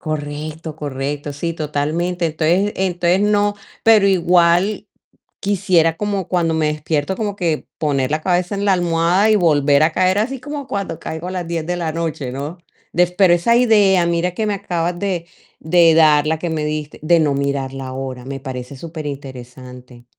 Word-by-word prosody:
Correcto, 155 Hz, +1 st, -5 dB
correcto, 145 Hz, 0 st, -4 dB
sí, 165 Hz, +4 st, -3 dB
totalmente, 160 Hz, +3 st, -1 dB
entonces 170 Hz, +6 st, +1 dB
entonces 180 Hz, -1 st, +1 dB
no, 205 Hz, 0 st, +2 dB, 0.3 s
pero 220 Hz, -3 st, +5 dB
igual 180 Hz, +2 st, +3 dB, 0.6 s
quisiera 180 Hz, -5 st, +2 dB
como 200 Hz, -2 st, -2 dB
cuando 170 Hz, -3 st, +1 dB
me 160 Hz, -1 st, +1 dB
despierto 150 Hz, +2 st, -2 dB
como 210 Hz, -3 st, -2 dB
que 170 Hz, -6 st, -2 dB
poner 140 Hz, -3 st, 0 dB
la 155 Hz, +1 st, 0 dB
cabeza 180 Hz, +2 st, 0 dB
en 200 Hz, -, -3 dB
la 200 Hz, -, +4 dB
almohada 175 Hz, +3 st, +2 dB
y 215 Hz, -, +5 dB
volver 145 Hz, -6 st, +3 dB
a 160 Hz, -, +3 dB
caer, 185 Hz, +3 st, +2 dB
así 255 Hz, +6 st, -1 dB
como 290 Hz, +1 st, -6 dB
cuando 200 Hz, -5 st, -4 dB
caigo 160 Hz, +2 st, -6 dB
a -, -, -4 dB
las 180 Hz, -2 st, -4 dB
10 165 Hz, -2 st, -3 dB
de 180 Hz, +2 st, -2 dB
la 170 Hz, -2 st, -2 dB
noche, 155 Hz, -5 st, -3 dB
¿no?, 145 Hz, +6 st, -6 dB, 0.4 s
de 180 Hz, +1 st, +4 dB
pero 180 Hz, 0 st, +3 dB
esa 205 Hz, +8 st, +3 dB
idea, 205 Hz, -7 st, +4 dB
mira 170 Hz, +1 st, 0 dB
que 215 Hz, +5 st, -3 dB
me 210 Hz, -, 0 dB
acabas 175 Hz, -3 st, -2 dB
de 180 Hz, -3 st, -2 dB, 0.3 s
de 165 Hz, +1 st, +4 dB
dar, 155 Hz, -2 st, +5 dB
la 160 Hz, +1 st, +1 dB
que 175 Hz, -, -3 dB
me 160 Hz, -1 st, -2 dB
diste, 150 Hz, 0 st, -4 dB
de 165 Hz, +2 st, +3 dB
no 150 Hz, -3 st, +2 dB
mirar 140 Hz, -1 st, -2 dB
la 135 Hz, -1 st, -6 dB
hora, 130 Hz, -1 st, -6 dB
me 135 Hz, +1 st, -6 dB
parece 130 Hz, 0 st, -7 dB
superinteresante. 130 Hz, -5 st, -9 dB
165 Hz, 180 wpm, -19 LUFS, 145-185 Hz, 0.6 s, pero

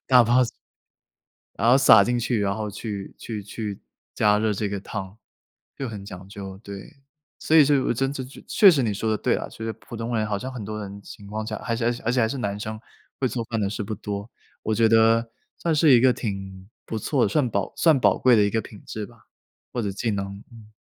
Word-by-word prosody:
打 125 Hz, -2 st, +6 dB
包 120 Hz, +3 st, +4 dB, 1.1 s
然 115 Hz, -, +2 dB
后 130 Hz, -, +7 dB
撒 110 Hz, -7 st, +7 dB
进 120 Hz, 0 st, 0 dB
去， 120 Hz, -1 st, 0 dB
然 100 Hz, -1 st, 0 dB
后 105 Hz, -1 st, -4 dB
去 100 Hz, -1 st, -6 dB
去 110 Hz, -3 st, -6 dB
去 105 Hz, 0 st, -6 dB, 0.3 s
加 105 Hz, -1 st, +3 dB
热 110 Hz, 0 st, +1 dB
这 105 Hz, 0 st, -2 dB
个 100 Hz, -, -3 dB
汤， 100 Hz, 0 st, -6 dB, 0.6 s
就 135 Hz, -, -4 dB
很 105 Hz, -3 st, -7 dB
讲 95 Hz, -2 st, -10 dB
究， 95 Hz, -1 st, -8 dB
对。 100 Hz, +7 st, -10 dB, 0.4 s
所 160 Hz, -, 0 dB
以 155 Hz, -, +9 dB
就 145 Hz, +1 st, +3 dB
有 135 Hz, -, +1 dB
呃 -, -, +3 dB
真 135 Hz, +3 st, 0 dB
这 130 Hz, -2 st, -5 dB
就 130 Hz, -, -12 dB
确 200 Hz, -3 st, +7 dB
实 140 Hz, -6 st, +2 dB
你 105 Hz, -3 st, 0 dB
说 110 Hz, +2 st, -1 dB
的 110 Hz, -, 0 dB
对 -, -, +1 dB
啊， -, -, -4 dB
所 110 Hz, -, -7 dB
以 110 Hz, -, -2 dB
普 115 Hz, +2 st, -11 dB
通 115 Hz, +1 st, -3 dB
人 110 Hz, -, 0 dB
好 105 Hz, -1 st, -1 dB
像 130 Hz, +6 st, -5 dB
很 120 Hz, -5 st, -6 dB
多 105 Hz, +1 st, -5 dB
人 100 Hz, 0 st, -7 dB
情 100 Hz, -, -12 dB
况 110 Hz, +2 st, -4 dB
下， 110 Hz, -2 st, -3 dB
而 115 Hz, +1 st, -3 dB
且 115 Hz, -, -2 dB
呃， -, -, +4 dB, 0.2 s
而 -, -, +3 dB
且 125 Hz, -, +2 dB
还 110 Hz, -, +2 dB
是 135 Hz, -, -4 dB
男 100 Hz, -4 st, -2 dB
生 110 Hz, +1 st, -5 dB, 0.4 s
会 130 Hz, -, +2 dB
做 120 Hz, -2 st, -3 dB
饭 115 Hz, -1 st, -3 dB
的 100 Hz, -, +1 dB
是 105 Hz, +1 st, -4 dB
不 110 Hz, +1 st, -4 dB
多。 100 Hz, +2 st, -6 dB, 0.3 s
我 110 Hz, -, 0 dB
觉 115 Hz, +1 st, +4 dB
得 115 Hz, +1 st, +4 dB, 0.3 s
算 165 Hz, -2 st, 0 dB
是 155 Hz, 0 st, +4 dB
一 120 Hz, -, +7 dB
个 130 Hz, +1 st, +6 dB
挺 95 Hz, -4 st, -6 dB, 0.2 s
不 110 Hz, -, -4 dB
错 135 Hz, +4 st, 0 dB
的， -, -, +2 dB
涮 145 Hz, -6 st, +1 dB
宝 100 Hz, -2 st, -2 dB
算 160 Hz, -5 st, +4 dB
宝 -, -, +4 dB
贵 125 Hz, -2 st, +4 dB
的 105 Hz, -, +5 dB
一 -, -, +2 dB
个 110 Hz, 0 st, 0 dB
品 105 Hz, -, -13 dB
质 110 Hz, -1 st, -5 dB
吧， -, -, -16 dB, 0.5 s
或 120 Hz, -, -1 dB
者 100 Hz, -2 st, -2 dB
技 110 Hz, +3 st, -2 dB
能， 100 Hz, 0 st, -4 dB
嗯。 110 Hz, -2 st, -15 dB
110 Hz, 265 characters per minute, -24 LUFS, 100-120 Hz, 1.1 s, 以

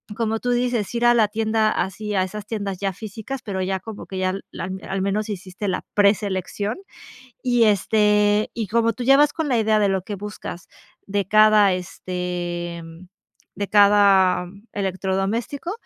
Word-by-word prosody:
como 225 Hz, -1 st, -1 dB
tú 245 Hz, -, -1 dB
dices, 245 Hz, -4 st, 0 dB
ir 235 Hz, 0 st, +1 dB
a 240 Hz, -, +6 dB
la 225 Hz, -3 st, +4 dB
tienda, 220 Hz, 0 st, +1 dB
así 210 Hz, +1 st, -3 dB
a 190 Hz, -, +3 dB
esas 205 Hz, +2 st, -6 dB
tiendas 200 Hz, -4 st, -4 dB
ya 195 Hz, 0 st, -1 dB
físicas, 220 Hz, +6 st, -7 dB
pero 195 Hz, -3 st, -3 dB
ya 190 Hz, +1 st, -1 dB
como 220 Hz, -2 st, -9 dB
que 190 Hz, -, -6 dB
ya 185 Hz, 0 st, 0 dB, 0.2 s
la -, -, -5 dB, 0.2 s
al 195 Hz, 0 st, -2 dB
menos 205 Hz, +2 st, -1 dB
hiciste 195 Hz, 0 st, -5 dB
la 190 Hz, -, -2 dB
preselección, 200 Hz, 0 st, 0 dB, 0.7 s
y 245 Hz, -2 st, +3 dB
este, 210 Hz, 0 st, +2 dB
y 225 Hz, -3 st, -3 dB
como 230 Hz, +2 st, +1 dB
tú 245 Hz, -, -6 dB
ya 270 Hz, +2 st, +6 dB
vas 290 Hz, 0 st, +4 dB
con 320 Hz, -3 st, -2 dB
la 250 Hz, -, +2 dB
idea 215 Hz, -1 st, +2 dB
de 205 Hz, -1 st, +2 dB
lo 190 Hz, -2 st, -1 dB
que 205 Hz, -, -5 dB
buscas 200 Hz, -3 st, -8 dB, 0.4 s
de 200 Hz, -1 st, -1 dB
cada, 215 Hz, -1 st, +5 dB
este, 175 Hz, -1 st, -4 dB, 0.7 s
de 200 Hz, -, -3 dB
cada 200 Hz, -3 st, +5 dB, 0.3 s
electrodoméstico, 195 Hz, -, -2 dB
205 Hz, 165 wpm, -22 LUFS, 190-220 Hz, 0.7 s, a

